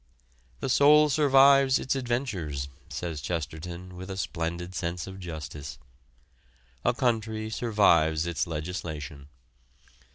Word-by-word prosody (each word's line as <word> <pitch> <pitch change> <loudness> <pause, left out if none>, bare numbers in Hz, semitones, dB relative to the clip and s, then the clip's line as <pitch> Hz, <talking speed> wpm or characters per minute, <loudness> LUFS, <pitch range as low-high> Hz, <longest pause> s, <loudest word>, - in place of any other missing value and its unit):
"The - - -2
soul 150 +3 +6
survives 135 -2 +5
its 130 - -1
adventures," 105 - -2 0.2
says 80 -4 -4
Chesterton 85 +3 -5
with 95 +2 -8
a 95 - -5
splendid 85 0 -3
sense 85 -1 -3
of 95 0 -9
justice. 80 -5 -7 1.1
A 120 - +3
country 110 -3 -1
survives 85 -9 +3
its 85 0 -1
legislation. 75 -3 -5
90 Hz, 105 wpm, -27 LUFS, 80-120 Hz, 1.1 s, soul